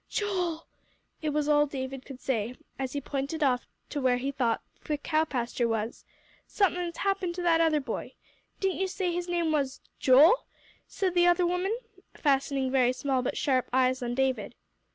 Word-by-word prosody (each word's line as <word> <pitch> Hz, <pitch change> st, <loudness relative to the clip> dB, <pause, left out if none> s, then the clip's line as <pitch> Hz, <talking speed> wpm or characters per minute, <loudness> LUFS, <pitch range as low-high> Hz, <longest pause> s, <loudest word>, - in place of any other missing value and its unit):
"Joel." 360 Hz, -6 st, -1 dB, 0.6 s
It 310 Hz, -, -1 dB
was 295 Hz, 0 st, 0 dB
all 295 Hz, 0 st, +4 dB
David 265 Hz, -1 st, -5 dB
could 270 Hz, -2 st, -9 dB
say, 240 Hz, -2 st, -1 dB, 0.2 s
as 265 Hz, -1 st, -3 dB
he 285 Hz, -, -2 dB
pointed 280 Hz, +3 st, -2 dB
off 250 Hz, -3 st, +1 dB, 0.3 s
where 260 Hz, -4 st, +2 dB
he 270 Hz, +3 st, -2 dB
thought 240 Hz, -4 st, 0 dB, 0.2 s
the 300 Hz, -, -1 dB
cow 310 Hz, +2 st, +1 dB
pasture 245 Hz, -3 st, -1 dB
was. 225 Hz, 0 st, -3 dB, 0.4 s
"Somethin's 360 Hz, -4 st, 0 dB
happened 390 Hz, -3 st, -1 dB
to 360 Hz, -, -4 dB
that 330 Hz, -1 st, +4 dB
other 315 Hz, -2 st, +3 dB
boy. 275 Hz, -, -5 dB, 0.4 s
Didn't 385 Hz, -2 st, 0 dB
you 385 Hz, -, +1 dB
say 370 Hz, -2 st, -2 dB
his 350 Hz, +1 st, -3 dB
name 340 Hz, -2 st, +1 dB
was 280 Hz, -4 st, 0 dB, 0.2 s
Joel?" 300 Hz, -, +6 dB, 0.4 s
said 375 Hz, -3 st, -1 dB
the 350 Hz, 0 st, +4 dB
other 350 Hz, 0 st, +4 dB
woman, 360 Hz, +5 st, 0 dB, 0.4 s
fastening 275 Hz, -2 st, +1 dB
very 255 Hz, -2 st, +3 dB
small 265 Hz, 0 st, 0 dB
but 250 Hz, -, -2 dB
sharp 260 Hz, -4 st, +1 dB
eyes 255 Hz, 0 st, +2 dB
on 240 Hz, 0 st, -2 dB
David. 265 Hz, 0 st, 0 dB
290 Hz, 175 wpm, -28 LUFS, 260-345 Hz, 0.6 s, Joel